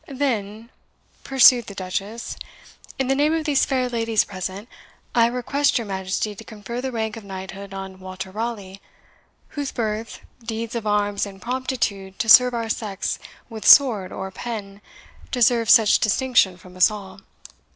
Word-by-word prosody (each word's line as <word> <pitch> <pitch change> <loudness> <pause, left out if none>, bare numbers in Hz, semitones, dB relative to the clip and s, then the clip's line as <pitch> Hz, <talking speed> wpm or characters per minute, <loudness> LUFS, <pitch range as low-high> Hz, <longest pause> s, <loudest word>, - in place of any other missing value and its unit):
"Then," 235 -5 -3 0.5
pursued 255 -3 +5
the 200 - -9
Duchess, 195 +4 -5 0.6
"in 265 - -1
the 270 - +2
name 295 +3 +2
of 320 -1 -2
these 290 -3 +2
fair 260 -2 0
ladies 230 -2 +1
present, 190 +2 -6 0.5
I 230 -1 +4
request 265 +4 0
your 235 - -3
Majesty 190 +2 -3
to 200 - -11
confer 225 +3 -7
the 260 0 -3
rank 220 -2 -3
of 225 - -9
knighthood 195 0 -8
on 190 -1 -8
Walter 185 0 -7
Raleigh, 205 -3 -5 0.7
whose 285 -2 -4
birth, 220 -1 -4 0.2
deeds 225 0 -5
of 230 -3 -4
arms, 205 -1 0
and 195 -1 -11
promptitude 230 -5 -3
to 225 - -2
serve 250 +2 +7
our 230 -1 -2
sex 210 -3 -3 0.3
with 225 -2 -8
sword 220 -10 +6
or 190 0 -6
pen, 205 -2 -7 0.5
deserve 235 -2 +2
such 220 -2 +6
distinction 215 -4 +2
from 180 0 -16
us 185 - +5
all." 195 -3 -9
220 Hz, 155 wpm, -22 LUFS, 195-245 Hz, 0.7 s, serve